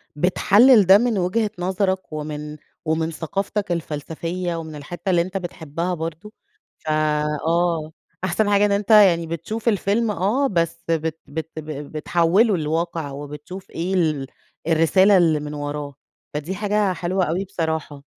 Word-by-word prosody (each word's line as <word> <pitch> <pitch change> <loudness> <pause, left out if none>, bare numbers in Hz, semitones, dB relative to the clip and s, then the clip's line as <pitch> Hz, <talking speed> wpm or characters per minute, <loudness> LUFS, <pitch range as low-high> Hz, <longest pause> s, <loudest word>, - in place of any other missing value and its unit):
بتحلل 205 - +5
ده 190 +2 +8
من 235 -1 +1
وجهة 200 +4 0
نظرك 190 -1 -1
ومن 150 0 -5 0.3
ومن 160 +1 0
ثقافتك 195 +5 -3
الفلسفية 170 +2 -3
ومن 160 -2 -6
الحتة 170 +5 -6
اللي 175 -2 +4
أنت 185 +3 -3
بتحبها 170 -1 -4
برضو، 165 +5 -6 0.4
ف - - -19 0.6
آه، 165 -2 +1 0.3
أحسن 190 +3 +1
حاجة 205 0 +4
إن 205 - +1
أنت 200 0 -1
يعني 185 -6 +6
بتشوف 170 +8 -5
الفيلم 210 +2 +1
آه، 210 +9 +1
بس 170 -4 -1
بت 160 -1 -1
بت 160 +2 -5
ب 155 - -9 0.3
بتحوله 175 +7 +2
لواقع 160 -1 -2
وبتشوف 150 +7 -8
إيه 180 +3 -3
ال 155 -7 +1 0.4
الرسالة 185 +5 +5
اللي 165 -4 +3
من 150 0 -6
وراه، 145 -1 -5 0.4
فدي 155 +6 -4
حاجة 205 -1 +1
حلوة 180 +2 -1
أوي 175 +5 -1
بصراحة. 160 -6 -3
170 Hz, 140 wpm, -22 LUFS, 160-195 Hz, 0.6 s, ده